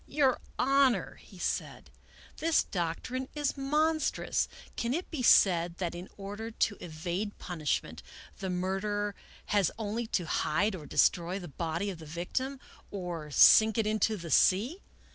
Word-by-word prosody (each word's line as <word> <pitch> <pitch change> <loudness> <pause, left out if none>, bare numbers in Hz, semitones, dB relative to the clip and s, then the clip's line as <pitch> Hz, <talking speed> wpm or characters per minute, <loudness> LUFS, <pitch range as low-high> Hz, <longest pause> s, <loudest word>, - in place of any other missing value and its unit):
" - - -29
Your 270 -4 +4 0.2
Honor," 265 -8 +2
he 190 - -16
said, - - -3 0.2
" - - -23
this 325 0 +3
doctrine 195 +9 -3
is 295 -2 -1
monstrous. 305 +3 0 0.3
Can 235 +3 -1
it 350 - -5
be 305 -6 -3
said 175 -7 +5
that, 175 -3 -2
in 175 +2 -8
order 205 +3 -6
to 215 -2 0
evade 175 +5 -4
punishment, 160 -5 -3 0.4
the 190 - -3
mur 185 +1 -1
derer 205 -1 -1 0.4
has 200 -5 +4
only 225 +1 -3
to 180 -5 -1
hide 195 +6 +1
or 155 -6 -8
destroy 175 +2 +2
the 180 -3 -7
body 170 +6 -3
of 175 - -9
the 160 - -10
victim, 255 - -3 0.3
or 175 -6 -5
sink 220 +9 +7
it 225 - +2
into 215 0 +1
the 165 -3 -7
sea? 240 - +3
205 Hz, 160 wpm, -30 LUFS, 175-240 Hz, 0.4 s, sink